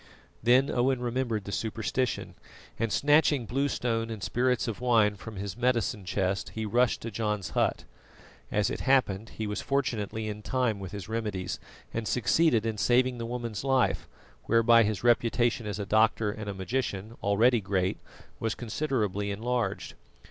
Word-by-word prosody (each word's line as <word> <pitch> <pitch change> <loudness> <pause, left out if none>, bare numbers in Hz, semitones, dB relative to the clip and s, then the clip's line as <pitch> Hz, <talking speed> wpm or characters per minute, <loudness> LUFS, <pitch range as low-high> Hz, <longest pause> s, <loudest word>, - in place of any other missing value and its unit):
Then 125 +4 +4
Owen 130 +1 +2
remembered 120 -3 -1
the 100 - -7
superstition, 115 +4 -2 0.5
and 115 -2 0
snatching 145 -2 +3
blue 135 +6 0
stone 115 -3 -1
and 110 -3 -6
spirits 125 +1 +1
of 115 0 -4
wine 110 -4 +3
from 110 +2 -9
his 100 -1 -5
medicine 120 -4 0
chest, 95 +1 -1
he 110 0 -2
rushed 120 +3 +2
to 115 - -5
John's 105 -3 -2
hut. - - 0 0.7
As 105 -1 +1
it - - -3
happened, 115 -6 +2
he 110 - -2
was 105 0 -3
fortunately 110 -6 -1
in 105 0 -5
time 120 -3 0
with 95 -2 -7
his 100 -4 -7
remedies 105 -5 -3 0.3
and 115 -1 -2
succeeded 125 -1 +2
in 110 -2 -2
saving 125 +2 +2
the 115 - -4
woman's 120 -3 -4
life, 135 -3 +1 0.4
whereby 115 +1 +5
his 110 -1 0
reputation 120 -1 +2
as 105 - -3
a 100 - -3
doctor 110 0 +3
and 105 -1 -6
a - - -3
magician, 110 +1 -3
already 115 +4 +3
great, 95 -1 -1 0.4
was 115 0 -1
considerably 110 -6 -2
enlarged. 115 +4 -2
115 Hz, 160 wpm, -28 LUFS, 105-125 Hz, 0.7 s, whereby